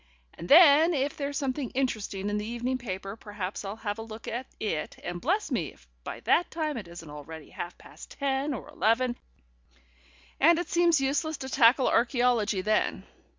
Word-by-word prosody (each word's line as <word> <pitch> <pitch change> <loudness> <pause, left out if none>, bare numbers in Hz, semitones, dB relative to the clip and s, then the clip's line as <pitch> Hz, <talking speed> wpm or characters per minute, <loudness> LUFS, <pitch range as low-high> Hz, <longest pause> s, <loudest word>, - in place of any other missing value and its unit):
And 170 - -9
then, 320 +1 +8
if 275 +1 -1
there's 280 -1 -3
something 270 -2 -2
interesting 205 -6 -2
in 210 - 0
the 210 - -4
evening 245 +2 -2
paper, 195 -3 -5
perhaps 205 -3 -6
I'll 200 +1 -5
have 215 -1 -4
a - - -4
look 225 0 -9
at 245 +3 -4
it, 160 -8 -3
and 175 0 -5
bless 375 - 0
me, 175 - -1
if - - -24 0.2
by - - -7
that 350 - +2
time 310 -2 -2
it 210 -7 -6
isn't 170 -1 -10
already 150 +1 -10
half 175 - -6
past - - -13
ten 275 +1 0
or - - -8
eleven, 240 +3 +1 1.2
and 330 +3 +6
it 350 - -3
seems 340 -3 +4
useless 280 +3 0
to 265 - -6
tackle 255 0 +5
archæology 235 -5 +2
then. 215 +1 +1
240 Hz, 180 wpm, -28 LUFS, 205-280 Hz, 1.2 s, then